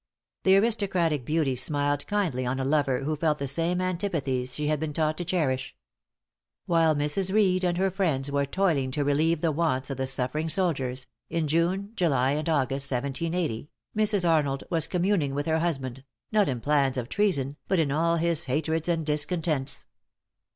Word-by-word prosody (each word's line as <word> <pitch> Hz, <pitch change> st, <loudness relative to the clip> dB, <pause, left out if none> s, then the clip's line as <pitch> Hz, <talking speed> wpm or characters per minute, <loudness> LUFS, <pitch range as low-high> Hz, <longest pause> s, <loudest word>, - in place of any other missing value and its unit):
The 190 Hz, 0 st, +5 dB
aristocratic 190 Hz, -, +1 dB
beauty 150 Hz, -3 st, +1 dB
smiled 145 Hz, +2 st, -1 dB
kindly 185 Hz, -12 st, 0 dB
on 130 Hz, +2 st, -2 dB
a 135 Hz, -, -1 dB
lover 140 Hz, -2 st, +1 dB
who 155 Hz, +3 st, -1 dB
felt 150 Hz, 0 st, +1 dB
the 140 Hz, -, -3 dB
same 165 Hz, +6 st, 0 dB
antipathies 160 Hz, -9 st, -1 dB
she 150 Hz, -, -2 dB
had 150 Hz, 0 st, +1 dB
been 155 Hz, -1 st, -3 dB
taught 155 Hz, 0 st, 0 dB
to -, -, -1 dB
cherish. 155 Hz, -7 st, -1 dB, 0.9 s
While 165 Hz, -2 st, +3 dB
Mrs. 150 Hz, +6 st, 0 dB
Reed 190 Hz, -3 st, +3 dB
and 175 Hz, -1 st, +1 dB
her 190 Hz, +1 st, +1 dB
friends 155 Hz, -8 st, 0 dB
were 140 Hz, 0 st, 0 dB
toiling 155 Hz, -6 st, +1 dB
to 145 Hz, -, 0 dB
relieve 155 Hz, +3 st, +1 dB
the 165 Hz, -, +2 dB
wants 145 Hz, -4 st, 0 dB
of 135 Hz, -, -4 dB
the 130 Hz, 0 st, -2 dB
suffering 135 Hz, +5 st, -1 dB
soldiers 135 Hz, -9 st, 0 dB, 0.2 s
in 165 Hz, -2 st, -1 dB
June, 175 Hz, +6 st, 0 dB
July 135 Hz, -, +2 dB
and 155 Hz, +3 st, -1 dB
August, 140 Hz, -2 st, +1 dB
1780, 140 Hz, +1 st, -2 dB, 0.3 s
Mrs. 210 Hz, -4 st, +2 dB
Arnold 145 Hz, -4 st, +1 dB
was 165 Hz, -3 st, +1 dB
communing 175 Hz, -6 st, 0 dB
with 145 Hz, 0 st, -2 dB
her 160 Hz, 0 st, +1 dB
husband, 135 Hz, -6 st, -2 dB, 0.3 s
not 210 Hz, -5 st, +3 dB
in 125 Hz, -3 st, -3 dB
plans 140 Hz, -2 st, +2 dB
of 120 Hz, -2 st, -3 dB
treason, 145 Hz, -8 st, 0 dB
but 190 Hz, -, +1 dB
in 155 Hz, -4 st, +1 dB
all 165 Hz, +3 st, +2 dB
his 170 Hz, -1 st, +1 dB
hatreds 160 Hz, +5 st, -1 dB
and 165 Hz, -2 st, 0 dB
discontents. 150 Hz, -1 st, -1 dB
155 Hz, 175 wpm, -27 LUFS, 135-175 Hz, 0.9 s, The